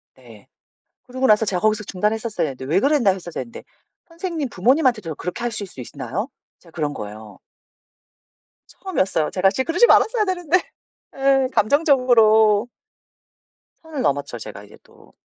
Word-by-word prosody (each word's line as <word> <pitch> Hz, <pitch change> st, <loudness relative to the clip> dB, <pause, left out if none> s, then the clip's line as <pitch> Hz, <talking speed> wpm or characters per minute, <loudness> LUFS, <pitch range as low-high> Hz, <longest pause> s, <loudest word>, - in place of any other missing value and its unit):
네. -, -, -17 dB, 0.6 s
그러고 255 Hz, +1 st, -2 dB
나서 215 Hz, 0 st, +4 dB
제가 185 Hz, -3 st, -1 dB
거기서 215 Hz, -1 st, +1 dB
중단했었어야 210 Hz, +1 st, -2 dB
되는데 130 Hz, -2 st, -7 dB
"왜 165 Hz, +7 st, +2 dB
그랬나요." 260 Hz, -8 st, +2 dB
했었어야 175 Hz, -2 st, -7 dB
했는데 235 Hz, -, -12 dB, 0.5 s
"선생님 330 Hz, -4 st, -4 dB
부모님한테도 230 Hz, -, +1 dB
그렇게 180 Hz, +10 st, -6 dB
하실 220 Hz, -4 st, -3 dB
수 130 Hz, -, -11 dB
있나요?" -, -, -5 dB, 0.3 s
제가 165 Hz, -, -20 dB
그런 150 Hz, -3 st, -3 dB
거예요. 105 Hz, -1 st, -9 dB, 1.3 s
처음이었어요. 190 Hz, -, -1 dB
제가 190 Hz, +1 st, +3 dB
씨 235 Hz, +7 st, -1 dB
그러지 345 Hz, -, +3 dB
말았어야 445 Hz, -2 st, +4 dB
되는데. 355 Hz, -3 st, +1 dB, 0.6 s
예. 270 Hz, -1 st, +2 dB
감정적으로 225 Hz, -, +4 dB, 1.1 s
선을 315 Hz, -5 st, -6 dB
넘었죠, 140 Hz, -3 st, -1 dB
제가 105 Hz, -2 st, -9 dB
이제 105 Hz, -, -16 dB
또. -, -, -22 dB
220 Hz, 360 characters per minute, -21 LUFS, 180-275 Hz, 1.3 s, 나서